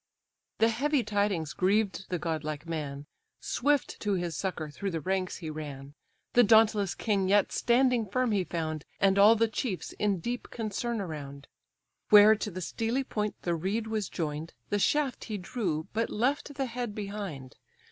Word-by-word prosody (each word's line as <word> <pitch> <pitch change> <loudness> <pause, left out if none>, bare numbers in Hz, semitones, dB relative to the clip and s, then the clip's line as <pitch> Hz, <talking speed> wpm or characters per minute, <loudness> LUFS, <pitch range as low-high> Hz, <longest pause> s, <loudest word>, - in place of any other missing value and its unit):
The 225 - +4
heavy 275 +4 +1
tidings 200 -7 0
grieved 195 +1 +1
the 180 - -1
godlike 155 -2 -3
man: 145 -3 -4 0.3
Swift 290 +1 0
to 205 -2 0
his 175 -4 -2
succour 160 -4 -3
through 200 +6 -3
the 165 -3 -2
ranks 185 +3 -1
he 160 -4 -6
ran. 145 -2 -7 0.4
The 245 - +7
dauntless 215 -3 +4
king 200 -4 0
yet 205 0 +4
standing 245 -2 +2
firm 250 +3 +1
he 200 -3 +2
found, 160 -3 -3 0.2
And 195 0 +4
all 210 +3 +8
the 230 +1 +3
chiefs 220 -3 -3
in 200 -3 +1
deep 240 +8 -4
concern 225 0 -3
around. 140 -5 -7 0.6
Where 210 0 +9
to 210 - -4
the 185 -1 -6
steely 230 +8 -1
point 210 -4 -2
the 175 - 0
reed 195 +7 -1
was 220 -3 -2
join'd, 155 0 -4 0.2
The 205 - +2
shaft 285 +4 +1
he 215 -2 -4
drew, 180 -5 -3
but 225 +2 0
left 275 +5 -1
the 270 - -1
head 240 -3 -4
behind. 200 -11 -6
200 Hz, 165 wpm, -29 LUFS, 165-225 Hz, 0.6 s, Where